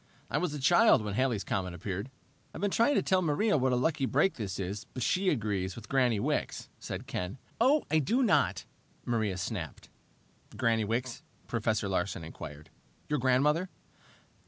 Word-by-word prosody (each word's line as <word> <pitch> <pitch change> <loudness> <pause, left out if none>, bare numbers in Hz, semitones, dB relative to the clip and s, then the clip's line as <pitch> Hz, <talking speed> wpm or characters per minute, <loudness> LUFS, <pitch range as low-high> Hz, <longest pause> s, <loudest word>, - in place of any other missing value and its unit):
I - - +1
was 180 -4 -1
a - - -4
child 175 - +5
when 105 -1 -3
Halley's 120 -3 +1
comet 90 -2 -2
appeared." 100 +5 -4 0.5
"I've - - -6
been 205 -1 +1
trying 235 +8 +3
to - - +2
tell 185 -2 +2
Maria 180 +7 +2
what 130 -2 +2
a - - +3
lucky 135 +2 +1
break 150 +10 +3
this 100 -5 -5
is, 100 +2 -4
but 130 - -2
she 185 +7 +2
agrees 100 - -1
with 115 -2 -10
Granny 125 -5 +2
Wicks," - - -2
said - - -6
Ken. 90 +7 -4 0.2
"Oh, 275 +6 +4
I 160 - +4
do 235 - +2
not!" 105 - +2 0.4
Maria 110 -6 0
snapped. 95 -4 -5 0.7
"Granny 115 -3 +2
Wicks?" 120 +3 -2 0.2
Professor 110 -3 0
Larsen 95 -1 -1
inquired. 75 -1 -9 0.4
"Your 150 -1 +1
grandmother?" 145 +8 +2
120 Hz, 170 wpm, -30 LUFS, 100-150 Hz, 0.7 s, child